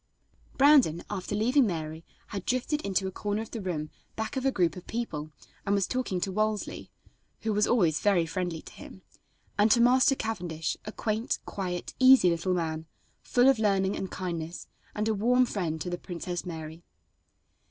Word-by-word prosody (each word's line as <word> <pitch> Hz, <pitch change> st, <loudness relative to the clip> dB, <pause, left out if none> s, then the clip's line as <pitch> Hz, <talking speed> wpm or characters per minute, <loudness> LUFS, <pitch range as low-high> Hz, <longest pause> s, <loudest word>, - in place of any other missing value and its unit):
Brandon, 270 Hz, -, +5 dB
after 200 Hz, 0 st, -3 dB
leaving 245 Hz, +4 st, +3 dB
Mary, 160 Hz, -2 st, -4 dB, 0.3 s
had 200 Hz, -4 st, -5 dB
drifted 255 Hz, +6 st, -1 dB
into 195 Hz, -1 st, 0 dB
a 190 Hz, -, -2 dB
corner 205 Hz, +2 st, -2 dB
of 225 Hz, -, -13 dB
the 225 Hz, -, -5 dB
room 160 Hz, -5 st, -3 dB, 0.2 s
back 220 Hz, +4 st, -4 dB
of 265 Hz, -, -2 dB
a -, -, +3 dB
group 175 Hz, -8 st, +1 dB
of 180 Hz, -, -10 dB
people, 160 Hz, -11 st, -4 dB, 0.3 s
and 200 Hz, 0 st, +1 dB
was 200 Hz, -2 st, +2 dB
talking 250 Hz, -8 st, -2 dB
to 190 Hz, +2 st, -2 dB
Wolsey 215 Hz, +1 st, -2 dB, 0.5 s
who 220 Hz, -1 st, -1 dB
was 210 Hz, +1 st, +2 dB
always 175 Hz, -10 st, +3 dB
very 195 Hz, -5 st, +3 dB
friendly 175 Hz, -1 st, -3 dB
to -, -, -12 dB
him 190 Hz, -, -12 dB, 0.6 s
and 210 Hz, +2 st, +5 dB
to 235 Hz, -, +5 dB
Master 255 Hz, +3 st, +5 dB
Cavendish, 175 Hz, -10 st, -3 dB
a 215 Hz, -, -5 dB
quaint, 220 Hz, +1 st, -1 dB
quiet, 180 Hz, -3 st, -4 dB
easy 255 Hz, -8 st, +7 dB
little 170 Hz, +2 st, 0 dB
man, 160 Hz, -2 st, -3 dB, 0.3 s
full 245 Hz, +1 st, +3 dB
of 270 Hz, -4 st, +5 dB
learning 195 Hz, -2 st, +2 dB
and 190 Hz, -, -4 dB
kindness, 170 Hz, -2 st, -5 dB, 0.3 s
and 215 Hz, +1 st, -1 dB
a 220 Hz, -, +2 dB
warm 245 Hz, +5 st, +3 dB
friend 170 Hz, -9 st, -2 dB
to 180 Hz, -, -3 dB
the 175 Hz, -, -3 dB
Princess 175 Hz, 0 st, -5 dB
Mary. 160 Hz, 0 st, -7 dB
195 Hz, 180 wpm, -28 LUFS, 175-225 Hz, 0.6 s, easy